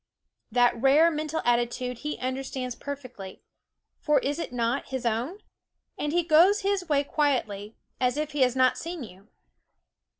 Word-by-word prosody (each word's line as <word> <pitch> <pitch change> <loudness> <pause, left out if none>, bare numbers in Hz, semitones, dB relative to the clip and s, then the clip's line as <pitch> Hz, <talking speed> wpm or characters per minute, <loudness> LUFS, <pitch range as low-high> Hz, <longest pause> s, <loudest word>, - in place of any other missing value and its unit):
That 245 0 +3
rare 295 +5 +5
mental 310 +1 -3
attitude 240 +1 0
he 300 +3 -4
understands 260 -1 -3
perfectly 255 -8 -8 0.6
for 300 -1 +2
is 285 +3 -1
it - - -4
not 240 +2 -1
his 260 -2 -4
own? 245 - -1 0.5
and 295 - -2
he 350 +2 +2
goes 345 +6 +5
his 390 -3 -1
way 285 -1 +3
quietly, 225 -9 -1 0.2
as 250 +1 +1
if 305 0 -2
he 290 -1 -2
had 250 -1 +3
not 255 -1 +3
seen 335 -3 -5
you. 195 -1 -13
270 Hz, 155 wpm, -27 LUFS, 245-305 Hz, 0.6 s, rare